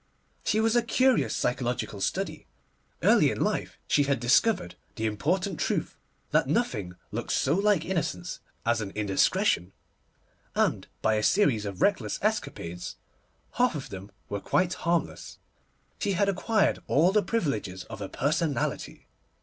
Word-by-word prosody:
She 215 - +1
was 225 +1 +2
a 240 - +5
curious 255 +2 +2
psychological 120 -4 -2
study. 155 - -2 0.6
Early - - +5
in - - -3
life - - -1
she 145 - +3
had 140 -2 +1
discovered 135 - +3 0.2
the 110 - -2
important 175 - -1
truth - - -1 0.4
that - - +3
nothing 105 - -1 0.2
looks - - -2
so - - +2
like 195 -2 +2
innocence 145 - -2 0.3
as 115 -1 +2
an 100 - -4
indiscretion; 95 -3 +1 0.8
and - - +1 0.2
by 110 -1 +3
a - - +1
series 130 - +3
of 95 -2 -3
reckless - - +1
escapades, 90 +1 -2 0.6
half 245 -6 +3
of 140 - -5
them 95 +1 -8 0.2
quite 170 - 0
harmless, 170 0 -2 0.6
she 200 -2 0
had 200 +2 +2
acquired 200 +3 +2
all 165 +6 +4
the 210 +1 +4
privileges 110 - -2
of - - -9
a 100 - -4
personality. 155 +1 -1
145 Hz, 140 wpm, -28 LUFS, -, 0.8 s, a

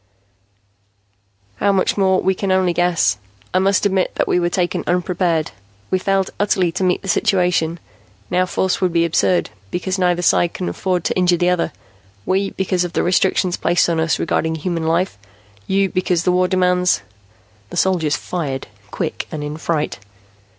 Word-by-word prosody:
"How 200 - +2
much 190 -1 +1
more, 190 -2 +3
we 190 - +2
can 190 +1 -2
only 185 -2 +2
guess. 170 - +1 0.3
I 185 - +3
must 195 +1 +2
admit 190 -2 +2
that - - 0
we - - +2
were 175 0 +1
taken 175 0 -1
unprepared. 175 -2 0 0.4
We 185 - +2
failed 195 0 0
utterly 190 -4 +2
to 190 - -3
meet 180 +2 +1
the - - -7
situation. 175 -2 +1 0.5
Now 185 +1 +2
force 190 +1 0
would 185 -2 +2
be 170 0 +2
absurd, 175 +2 +1 0.2
because 185 - -2
neither 175 -1 +1
side 170 0 +2
can 180 - -3
afford 180 -3 -1
to - - -1
injure 180 -1 +3
the 175 +1 +2
other; 175 -2 0 0.5
we, 195 +1 +1
because 185 -1 -1
of 175 -1 -5
the - - +1
restrictions 180 0 +1
placed 175 - +2
on 165 - 0
us 160 0 +1
regarding 160 0 0
human 165 0 -2
life, 165 - 0 0.5
you 195 0 +2
because 180 -2 0
the 180 - +2
war 180 0 +2
demands 180 -1 +2 0.3
" 105 -1 -33
The - - -7
soldiers 170 -6 +2
fired, 145 -7 -4 0.2
quick - - -4
and 150 -1 -4
in 150 +1 -4
fright. 160 -5 -2
180 Hz, 175 wpm, -19 LUFS, 165-185 Hz, 0.5 s, more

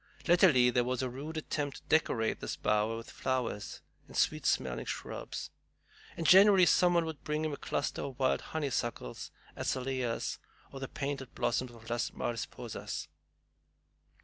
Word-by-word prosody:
Latterly 165 -9 +6
there 125 0 +3
was 125 +1 -1
a 130 - -2
rude 150 +5 -6
attempt 145 -2 -2
to - - -15
decorate 120 -8 +1
this - - -4
bower 105 +2 +1
with 115 - -9
flowers 125 -5 -2 0.3
and - - -8
sweet - - +2
smelling 65 -2 0
shrubs, - - -5 0.7
and 165 - -3
generally 190 +1 +8
some 175 +1 +4
one 170 -1 +3
would 160 -3 -6
bring 150 +1 -1
him 155 - -1
a - - -1
cluster 145 - -2
of 135 -3 -5
wild 130 0 +2
honeysuckles, 125 - -3 0.3
azaleas, 130 -2 -2 0.3
or 135 - -7
the 135 - -4
painted 140 -2 -4
blossoms 125 +2 0
of 115 -1 -14
Las 120 0 -1
Mariposas. 115 -2 -4
130 Hz, 150 wpm, -32 LUFS, 120-155 Hz, 0.7 s, generally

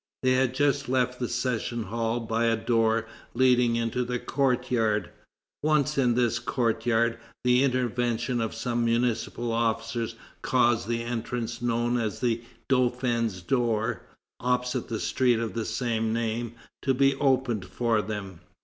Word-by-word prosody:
They 130 - +4
had 130 0 +2
just 140 -2 +1
left 125 -1 +1
the 125 - -2
session 120 -1 -1
hall 115 +3 -2
by 115 +1 0
a 115 0 +3
door 115 -1 +1 0.3
leading 125 -2 +4
into 115 +2 0
the 125 0 -2
courtyard. 125 -5 0 0.5
Once 150 -1 +2
in 125 -3 +2
this 120 -2 +2
courtyard, 115 -1 +1 0.2
the 125 +1 +4
intervention 120 -2 0
of 110 -1 -2
some 120 +1 -1
municipal 115 0 0
officers 115 0 -1 0.3
caused 120 -4 +2
the 115 0 -1
entrance 120 0 -3
known 120 0 +1
as 110 -3 -2
the 120 -2 0 0.3
Dauphin's 120 -6 +1
door, 115 0 0 0.4
opposite 125 0 -1
the 110 -2 -2
street 125 -3 +2
of 115 -1 -3
the 115 -1 -2
same 115 -3 -1
name, 115 0 -2 0.3
to 135 -1 +1
be 135 +1 +4
opened 130 -7 +1
for 115 -3 0
them. 100 -5 -6
120 Hz, 140 wpm, -27 LUFS, 115-125 Hz, 0.5 s, They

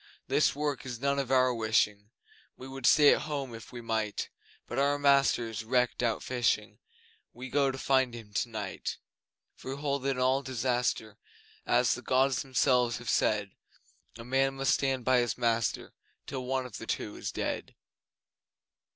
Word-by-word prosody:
This - - +2
work 145 -2 -2
is 125 -3 -6
none 140 +1 0
of 135 -2 -2
our 130 -1 +4
wishing 105 -2 0 0.5
We 130 - -9
would 135 -2 -2
stay 145 -2 +7
at - - -1
home 140 -5 -4
if 115 -2 -10
we 120 - -7
might 110 -2 -2 0.4
But 120 - -3
our 140 +1 +2
master 140 -4 +3
is 110 -1 -5
wrecked 125 +2 +1
out 115 -2 0
fishing, 120 -4 -1 0.5
We 130 0 -9
go 140 -2 +3
to 135 - -4
find 130 -2 +1
him 110 -3 -11
tonight. 110 -1 -3 0.6
For 130 - -7
we - - -10
hold 140 -1 -1
that 135 - -1
in 135 - -1
all 130 +2 +2
disaster 125 -4 -1 0.5
As - - +3
the - - -5
Gods 130 0 +2
Themselves 125 -2 +2
have 120 -1 -3
said 105 -2 +1 0.7
A 115 - -9
man 135 +2 +1
must 135 0 +2
stand 135 -3 0
by 130 -1 +4
his 120 -3 -1
master 115 -2 0 0.3
Till 130 -2 -5
one 130 0 -1
of 125 - -8
the - - -8
two - - -3
is - - -5
dead. - - -4
125 Hz, 175 wpm, -30 LUFS, 115-135 Hz, 0.7 s, stay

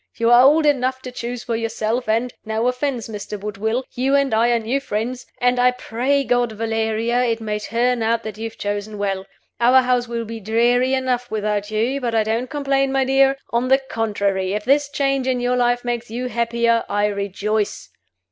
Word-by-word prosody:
You 230 0 +2
are 240 0 +8
old 300 +4 +5
enough 260 -2 +1
to 255 - -6
choose 245 0 -5
for 235 - -2
yourself, 225 +1 -2
and 230 +3 0
no 220 +2 -1
offense, 250 -2 -2
Mr. 210 -1 -6
Woodville, 215 +4 -2
you 265 +3 +1
and 275 -3 +2
I 230 +2 +3
are 240 - +3
new 230 +5 -1
friends 245 0 -4
and 245 0 +2
I 250 0 +5
pray 250 +3 -1
God, 245 -3 +1
Valeria, 225 +2 0
it 230 -1 0
may 210 -1 -3
turn 240 +2 0
out 230 +1 +1
that 215 -2 -6
you 220 +1 -6
have 225 - -21
chosen 205 +1 -4
well. 195 -1 -2 0.3
Our 255 +2 +5
house 250 -1 +1
will 235 0 -3
be 225 +1 -7
dreary 240 +5 +2
enough 250 -2 -1
without 210 -1 -2
you; 235 +6 -1
but 235 -2 -1
I 220 - +3
don't 225 +4 -2
complain, 275 -2 0
my 270 -1 +2
dear. 270 +1 +3
On 235 +2 +1
the 265 +1 +5
contrary, 205 -7 -1
if 210 0 -3
this 280 +2 +3
change 275 -2 0
in 255 -1 +1
your 245 +1 +1
life 245 0 +1
makes 240 -1 -3
you 250 +3 -4
happier, 235 -1 +1
I 205 0 +1
rejoice. 205 +1 -2
235 Hz, 200 wpm, -21 LUFS, 220-255 Hz, 0.3 s, are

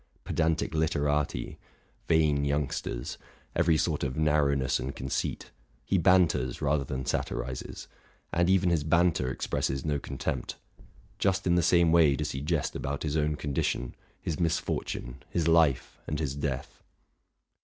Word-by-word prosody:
Pedantic 80 -1 0
literati, 75 -4 0 0.5
vain 75 -3 +3
young 70 -1 0
sters, - - -4 0.4
every 85 -1 +3
sort 80 -2 0
of 65 0 -2
narrowness 70 -4 +2
and 65 +2 -4
conceit, 65 0 -3 0.3
he 95 - +2
banters 85 -9 +3
rather 70 0 +1
than 65 -1 -4
satirizes; 65 +1 -3 0.5
and 85 +1 +2
even 95 -2 +3
his 80 -4 +1
banter 85 -4 +2
expresses 65 +1 -2
no 75 -2 0
contempt. 70 0 -4 0.6
Just 95 -1 +1
in 90 - +3
the 85 - +4
same 85 0 +4
way 80 -4 +5
does - - -2
he 65 - -4
jest 80 0 -1
about 70 +1 -3
his 75 -1 -1
own 75 -1 +1
condition, 70 -4 -2 0.3
his 80 - -4
misfortune, 80 -6 -2
his 85 -2 0
life, 80 -6 +3
and 75 - -2
his 70 -3 -2
death. 70 -2 -4
75 Hz, 145 wpm, -29 LUFS, 70-85 Hz, 0.6 s, way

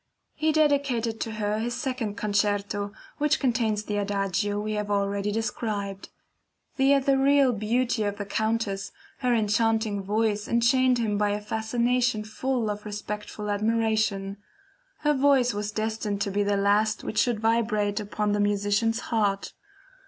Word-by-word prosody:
He 315 0 +1
dedicated 280 -7 +1
to 225 - -3
her 210 0 -1
his 235 +1 -2
second 250 -7 -3
Concerto, 205 -1 -1 0.3
which 300 +1 +2
contains 230 -5 0
the 210 -1 -3
Adagio 200 0 -1
we 215 +1 -3
have 210 -1 -2
already 200 0 0
described. 205 -3 -3 0.7
The 270 +1 +4
ethereal 275 -1 +4
beauty 230 +3 0
of 205 0 -2
the 205 - -4
Countess, 220 -1 -1 0.3
her 250 -2 +1
enchanting 220 -1 +1
voice 210 +1 0
enchained 250 +2 +3
him 210 -3 0
by 210 0 +2
a 205 0 -1
fascination 225 +2 0
full 220 +1 -2
of 210 0 -6
respectful 210 0 -5
admiration. 215 -2 0 0.6
Her 295 0 +3
voice 270 -3 +3
was 205 +1 -3
destined 215 -1 -2
to 200 - -1
be 205 +1 0
the 205 0 +1
last 205 +2 +2
which 215 - -2
should 240 -3 +2
vibrate 220 -2 +1
upon 210 0 -2
the 205 - +1
musician's 205 +3 +1
heart. 200 -3 0
215 Hz, 145 wpm, -26 LUFS, 205-235 Hz, 0.7 s, The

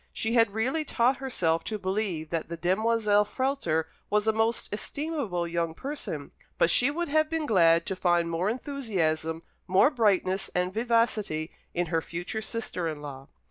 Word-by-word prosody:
She 225 +1 -1
had 225 -4 +3
really 260 +8 0
taught 255 -2 +2
herself 165 -11 0
to 215 - -2
believe 190 -5 -2
that 165 -1 -2
the 170 - -5
demoiselle 210 +3 +2
Frehlter 210 - -1 0.2
was 210 +1 +1
a 220 - +4
most 225 +1 0
estimable 235 - -2
young 165 -1 -2
person; 265 - -5 0.3
but 170 - +4
she 250 - +4
would 340 +4 -2
have 310 +1 +2
been 325 -1 -1
glad 170 - +4
to 190 - -3
find 175 -2 +2
more 170 +4 0
enthusiasm, 185 - -2 0.2
more 190 +10 +5
brightness 195 - +1
and 180 +1 0
vivacity, 220 -8 0 0.2
in 175 0 +1
her 165 - +3
future 175 +7 -4
sister 220 -6 -3
in 150 -2 -5
law. 135 -1 -8
205 Hz, 165 wpm, -28 LUFS, 170-235 Hz, 0.3 s, more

